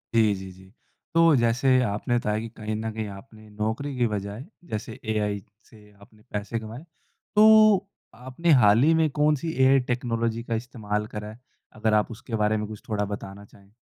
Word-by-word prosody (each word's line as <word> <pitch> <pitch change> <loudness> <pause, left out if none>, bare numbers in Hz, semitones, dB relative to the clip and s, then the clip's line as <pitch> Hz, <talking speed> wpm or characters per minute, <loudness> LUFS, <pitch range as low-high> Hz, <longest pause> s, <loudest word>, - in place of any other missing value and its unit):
जी, 110 -2 +4
जी, 95 0 -8
जी, 95 +1 -16 0.5
तो 165 -2 +5
जैसे 125 +2 +3
आपने 110 +3 -1
बताया 105 -2 -1
कि 115 - -5
कहीं 110 0 -4
न 110 +1 -3
कहीं 110 -1 -4
आपने 110 +2 -13
नौकरी 110 +7 -3
की 120 -2 +2
बजाय, 105 +3 -5 0.3
जैसे 110 +1 -5
एआई 105 -1 -1 0.3
से 105 -2 -18
आपने 105 +1 -19
पैसे 105 +3 -3
कमाए, 110 +5 -9 0.5
तो 215 -2 +6 0.3
आपने 130 +8 -2
हाल 105 +4 +5
ही 160 +2 +5
में 160 -1 +2
कौन 150 0 +4
सी 160 +3 -4
एआई 135 +1 +6
टेक्नोलॉजी 115 -1 -1
का 115 - -2
इस्तेमाल 110 -3 -4
करा 105 0 -5
है, 110 - -12 0.3
अगर 110 0 0
आप 105 +2 +2
उसके 115 +1 -6
बारे 105 0 +1
में 105 0 -3
कुछ 110 -1 -9
थोड़ा 105 -1 0
बताना 100 0 -7
चाहें? 100 0 -21
110 Hz, 185 wpm, -25 LUFS, 105-125 Hz, 0.5 s, तो